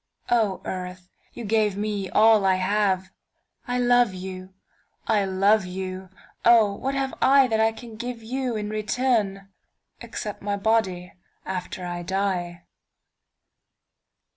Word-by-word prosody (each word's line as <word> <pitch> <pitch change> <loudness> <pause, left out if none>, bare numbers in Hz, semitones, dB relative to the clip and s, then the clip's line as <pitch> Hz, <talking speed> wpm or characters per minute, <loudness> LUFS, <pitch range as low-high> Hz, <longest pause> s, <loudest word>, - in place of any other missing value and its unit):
O 220 -5 +1
Earth, 180 -1 -6 0.2
you 235 - -7
gave 210 -2 +1
me 205 -2 -2
all 220 -1 +5
I 190 -1 +4
have,I 195 +5 -2
love 245 -4 +3
you, 185 0 -8 0.5
I 210 -3 +2
love 195 +2 +3
you, 185 0 -6 0.3
oh 225 -4 +6
what 270 +7 -3
have 270 -1 -1
IThat 260 -5 +5
I 220 0 +4
can 225 0 -11
give 240 0 -6
you 255 +1 -2
in 210 -1 -3
return—Except 210 -2 -3
my 200 0 -2
body 195 -4 0 0.3
after 185 -1 -5
I 175 0 -4
die? 180 -2 -2
205 Hz, 115 wpm, -24 LUFS, 190-225 Hz, 0.5 s, oh